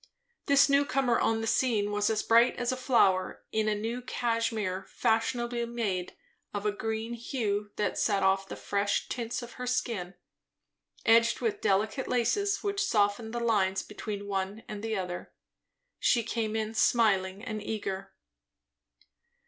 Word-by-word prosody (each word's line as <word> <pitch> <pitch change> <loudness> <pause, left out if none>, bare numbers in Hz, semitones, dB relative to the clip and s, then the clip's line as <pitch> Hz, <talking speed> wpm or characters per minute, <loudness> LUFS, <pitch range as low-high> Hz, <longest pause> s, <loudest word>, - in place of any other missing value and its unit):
This 280 -1 +6
new 280 0 +4
comer 265 -4 +1
on 225 0 +1
the - - -2
scene 220 -3 +1
was 205 0 +1
as 215 -1 0
bright 235 +2 +5
as 245 +1 -1
a - - -1
flower; 230 -8 +2
in 220 0 0
a 210 - +1
new 225 +4 -3
cashmere, 230 -6 -1
fashionably 235 +1 0
made, 205 -7 -3 0.4
of 205 0 -3
a 210 - +3
green 220 +2 -3
hue 220 -4 -2
that 210 - -1
set 200 -3 +2
off 195 0 +2
the - - -6
fresh 200 0 -1
tints 240 0 -3
of 240 - -9
her 250 - -3
skin, 225 -7 -2 0.9
edged 230 +1 +5
with 415 -3 -1
delicate 215 - +1
laces 400 - +1
which 400 -1 0
softened 210 +1 +1
the 240 - -3
lines 200 -5 +1
between 210 -1 -6
the - - -8
one 195 +2 -3
and 210 -1 -6
the 220 -1 -1
other. 180 -2 -5 0.7
She 235 -3 +3
came 220 -1 -2
in 220 0 -2
smiling 205 -4 +2
and 215 -3 -4
eager. 195 -2 -4
220 Hz, 155 wpm, -29 LUFS, 205-240 Hz, 0.9 s, This